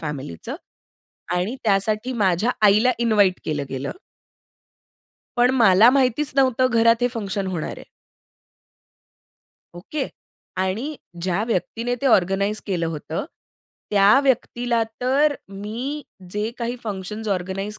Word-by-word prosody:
फॅमिलीचं 135 - -6 0.8
आणि 185 +8 -1
त्यासाठी 215 +4 +1
माझ्या 205 -1 +1 0.2
आईला 210 +5 +5
इन्व्हाईट 210 -6 +3
केलं 145 -2 -2
गेलं. 135 +1 -4 1.5
पण 245 +1 +4
मला 225 -2 +6
माहितीच 265 +1 +2
नव्हतं 260 -2 +3
घरात 230 -1 +4
हे 245 - +2
फंक्शन 200 -3 -3
होणार 180 -4 -3
आहे. - - -11 1.9
ओके. 260 +11 -4 0.5
आणि 190 +7 -1 0.4
ज्या 185 +2 0
व्यक्तीने 230 +2 -2
ते - - +2
ऑर्गनाइज 200 -1 +2
केलं 175 -5 -1
होतं, 160 - -4 0.7
त्या 205 +4 +6
व्यक्तीला 240 -3 +1 0.2
तर, 280 +4 +3
मी 225 +9 -5 0.3
जे 210 +3 -2
काही 240 +1 -2
फंक्शन्स 210 +1 -5
ऑर्गनाइज 195 +2 -3
210 Hz, 110 wpm, -22 LUFS, 190-245 Hz, 1.9 s, मला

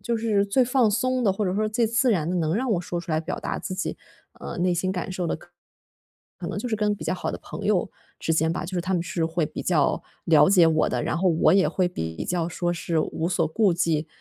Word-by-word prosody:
就 235 +3 -1
是 215 -3 +1
最 250 +6 +3
放 245 -2 +3
松 255 +3 0
的， 200 - +3
或 210 - -1
者 185 -1 -1
说 215 +1 0
最 230 +1 +1
自 235 +3 +2
然 170 -5 +1
的 - - -1
能 160 0 0
让 255 +3 -1
我 175 - +1
说 175 -1 -4
出 170 -1 -7
来 155 - +1
表 165 +3 -4
达 - - -3
自 185 - -5
己， 190 - -3 0.4
呃， - - -6
内 180 0 +2
心 180 +2 0
感 180 0 -4
受 185 -1 -2
的 - - -1
可 - - -17
能 - - -38 0.9
可 - - -6
能 - - -4
就 245 - -3
是 220 - 0
跟 210 -1 +1
比 205 - -9
较 - - 0
好 - - -3
的 - - -5
朋 - - -8
友 - - +1 0.3
之 - - -3
间 160 0 +2
吧， - - -3
就 185 +2 -6
是 175 - +1
他 190 +2 -2
们 175 - 0
是 170 -1 -2
会 165 -1 0
比 155 - -6
较 160 -6 +2 0.2
了 155 -1 +5
解 180 -4 +6
我 160 -1 +3
的， - - -1
然 - - -1
后 185 +2 +2
我 160 - +4
也 190 0 +4
会 185 -2 +1
比 80 - -5
较 175 -2 0
说 175 0 -2
是 170 -1 -2
无 160 +1 -2
所 170 -3 +1
顾 200 +1 +2
忌， 165 -2 0
180 Hz, 295 characters per minute, -25 LUFS, 165-210 Hz, 0.9 s, 解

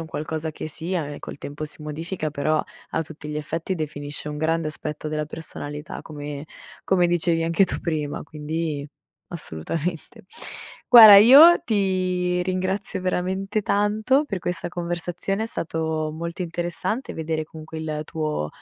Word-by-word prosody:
un 160 - -10
qualcosa 155 +1 -4
che 155 - -7
sia 165 0 -3
e 145 - -7
col - - -8
tempo 145 +2 -6
si 150 0 -9
modifica, 155 +1 -4
però, 155 +2 0 0.3
a 160 - 0
tutti 150 0 -10
gli 150 - -4
effetti 165 +5 -3
definisce 145 -1 -4
un 150 - -5
grande 160 +1 0
aspetto 150 0 -5
della 150 0 -2
personalità, 150 -1 -7
come 145 -1 -7 0.4
come 180 -2 +3
dicevi 170 -1 +1
anche 165 +4 +3
tu - - -3
prima, 150 -3 -2
quindi 150 -1 -4 0.4
assolutamente. 160 - -5 0.6
Guarda, 220 -4 +11
io 280 +11 +9
ti 185 -4 0
ringrazio 185 +1 -2
veramente 190 +3 -1
tanto 215 +8 +2
per 200 -9 -4
questa 175 -1 -3
conversazione, 175 +4 -3
è - - -3
stato 160 -4 -2
molto 170 +3 -5
interessante 175 +7 -3
vedere 160 0 -2
comunque 160 +1 -9
il 155 -1 -3
tuo 155 - -2
165 Hz, 145 wpm, -24 LUFS, 155-185 Hz, 0.6 s, Guarda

